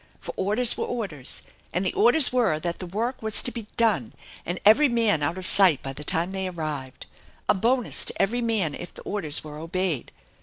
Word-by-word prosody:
For - - -8
orders 215 +5 +3
were - - -3
orders, 190 - -5 0.3
and 180 +3 -2
the 185 - -1
orders 245 +4 +5
were 225 -12 +1
that 170 +1 -5
the 185 - -7
work 230 +8 -4
was 220 -1 +1
to 250 - -3
be 230 -4 -8
done 225 0 +1 0.3
and 175 +1 -3
every 240 +8 +6
man 225 -9 +1
out 145 +5 -1
of 185 - -5
sight 185 -7 +6
by 135 - -5
the 150 - -7
time 165 +4 +1
they 190 -1 -4
arrived. 155 -7 -6 0.4
A - - +4
bonus 235 +5 +2
to - - -4
every 240 +5 0
man 215 -10 -1
if 175 - -8
the - - -12
orders 160 -8 -1
were 150 -1 -9
obeyed. 165 -3 -3
190 Hz, 205 wpm, -24 LUFS, 160-230 Hz, 0.4 s, every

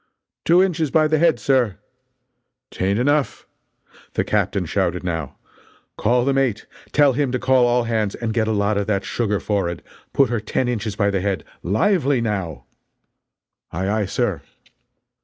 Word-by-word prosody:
"Two 175 +3 +5
inches 165 -5 0
by 155 +2 +3
the 155 0 +1
head, 165 -6 +3
sir." 120 -4 +1 0.9
"'T - - -5
ain't 100 +2 +1
enough!" 145 +3 0 0.7
The - - +1
captain - - 0
shouted, 90 +1 -1
now: 80 -6 -3 0.6
"Call 120 +2 +1
the 140 - +2
mate. 135 -6 0 0.3
Tell 145 -2 +4
him 135 0 0
to 125 - 0
call 130 -1 +3
all 120 0 +2
hands 110 -3 -1
and 115 -2 -3
get 110 -1 +1
a - - +1
lot 100 -1 +1
of 100 - -3
that 100 -2 0
sugar 105 -4 -1
forrard 95 -5 -2 0.3
put 135 -4 +3
her 120 - 0
ten 115 +4 -1
inches 110 -4 -2
by 100 -1 +1
the 95 -2 -1
head. 100 -1 -1 0.2
Lively, 140 - +2
now!" 95 -9 -3 1.1
"Aye 95 +4 -2
aye, 105 0 0
sir." - - -1
115 Hz, 165 wpm, -21 LUFS, 100-135 Hz, 1.1 s, Two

